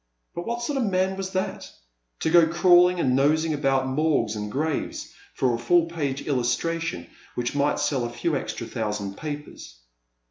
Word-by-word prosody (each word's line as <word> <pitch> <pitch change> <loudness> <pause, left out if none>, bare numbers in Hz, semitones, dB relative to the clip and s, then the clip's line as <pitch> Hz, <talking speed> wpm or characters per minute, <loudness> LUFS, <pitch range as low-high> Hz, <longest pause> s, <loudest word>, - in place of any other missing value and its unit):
But 175 - -6
what 235 +1 -2
sort 275 +2 -1
of 245 - +1
a - - 0
man 190 0 +1
was 190 0 -4
that! 185 0 -3 0.3
— - - -43
^to 160 - 0
go 170 -2 +7
crawling 175 +1 +5
and 130 -6 +2
nosing 155 +4 +2
about 135 -2 +1
morgues 130 -5 +1
and 105 0 -4
graves 150 +4 -3 0.2
for 125 -2 +1
a 115 - -2
full 170 +8 +3
page 145 -5 -3
illustration 130 - -1 0.3
which 120 0 -2
might 145 +1 +1
sell 135 -4 0
a 120 - -2
few 150 +6 -2
extra - - -4
thousand 105 -4 -3
papers. 150 - -7
150 Hz, 180 wpm, -25 LUFS, 125-170 Hz, 0.3 s, go